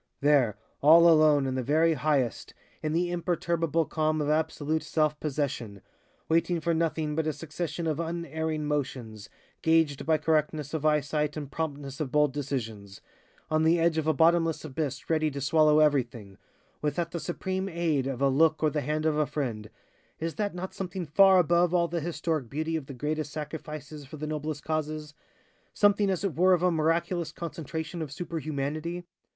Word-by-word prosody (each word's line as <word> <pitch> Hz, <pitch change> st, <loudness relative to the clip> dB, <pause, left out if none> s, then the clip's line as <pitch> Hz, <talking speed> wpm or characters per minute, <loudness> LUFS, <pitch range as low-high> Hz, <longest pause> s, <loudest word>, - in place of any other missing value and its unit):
"There, 140 Hz, -8 st, +3 dB, 0.2 s
all 165 Hz, +4 st, +8 dB
alone, 155 Hz, -3 st, +5 dB
in 130 Hz, -, -1 dB
the 130 Hz, -, -1 dB
very 160 Hz, +6 st, +3 dB
highest, 140 Hz, -4 st, -1 dB, 0.3 s
in 155 Hz, -, -2 dB
the 175 Hz, +2 st, 0 dB
imperturbable 170 Hz, -2 st, 0 dB
calm 155 Hz, 0 st, 0 dB
of 150 Hz, -1 st, -1 dB
absolute 155 Hz, 0 st, 0 dB
self 155 Hz, -1 st, 0 dB
possession, 140 Hz, -8 st, -3 dB, 0.5 s
waiting 165 Hz, +1 st, +2 dB
for 170 Hz, +1 st, 0 dB
nothing 160 Hz, -2 st, -1 dB
but 160 Hz, 0 st, 0 dB
a -, -, +2 dB
succession 165 Hz, +3 st, -5 dB
of 155 Hz, -1 st, -1 dB
unerring 160 Hz, -2 st, -3 dB
motions 125 Hz, -8 st, -4 dB, 0.3 s
gauged 160 Hz, -3 st, +2 dB
by 160 Hz, -1 st, +4 dB
correctness 150 Hz, -1 st, 0 dB
of 155 Hz, -1 st, 0 dB
eyesight 150 Hz, 0 st, 0 dB
and 145 Hz, -2 st, -6 dB
promptness 140 Hz, -3 st, -4 dB
of 145 Hz, -5 st, -3 dB
bold 150 Hz, -2 st, +3 dB
decisions, 115 Hz, -8 st, -5 dB, 0.5 s
on 155 Hz, 0 st, +3 dB
the 165 Hz, +2 st, +4 dB
edge 165 Hz, -1 st, +2 dB
of 155 Hz, -, -3 dB
a 160 Hz, -, +4 dB
bottomless 165 Hz, +1 st, +3 dB
abyss 140 Hz, -2 st, -4 dB
ready 155 Hz, -1 st, +1 dB
to 140 Hz, -1 st, -6 dB
swallow 150 Hz, +2 st, +4 dB
everything, 120 Hz, -10 st, 0 dB, 0.4 s
without 160 Hz, +3 st, -1 dB
the 170 Hz, -, -3 dB
supreme 190 Hz, +3 st, -3 dB
aid 165 Hz, -6 st, 0 dB
of 135 Hz, 0 st, -3 dB
a -, -, +5 dB
look 155 Hz, +4 st, +3 dB
or 155 Hz, -, +3 dB
the 150 Hz, -, -1 dB
hand 155 Hz, +3 st, -2 dB
of 155 Hz, -1 st, +2 dB
a 150 Hz, -1 st, +2 dB
friend 120 Hz, -8 st, -4 dB, 0.5 s
is 165 Hz, 0 st, -3 dB
that 205 Hz, -3 st, -2 dB
not 185 Hz, +1 st, -5 dB
something 185 Hz, -1 st, -4 dB
far 190 Hz, +5 st, +6 dB
above 175 Hz, 0 st, +3 dB
all 170 Hz, -1 st, +3 dB
the 170 Hz, 0 st, -3 dB
historic 160 Hz, -5 st, -2 dB
beauty 160 Hz, +3 st, -2 dB
of 150 Hz, -4 st, -4 dB
the 140 Hz, -, -8 dB
greatest 150 Hz, +2 st, -3 dB
sacrifices 150 Hz, -1 st, -7 dB
for 155 Hz, -, -9 dB
the 155 Hz, -, -4 dB
noblest 155 Hz, 0 st, -4 dB
causes 155 Hz, -1 st, -3 dB, 0.6 s
something 205 Hz, -1 st, +3 dB
as 190 Hz, -1 st, -1 dB
it 195 Hz, -5 st, -1 dB
were 185 Hz, +2 st, +5 dB
of 175 Hz, -, -3 dB
a 180 Hz, -, +4 dB
miraculous 165 Hz, +1 st, 0 dB
concentration 165 Hz, +1 st, -5 dB
of 150 Hz, -4 st, -5 dB
superhumanity? 155 Hz, +1 st, -4 dB
155 Hz, 175 wpm, -28 LUFS, 145-165 Hz, 0.6 s, all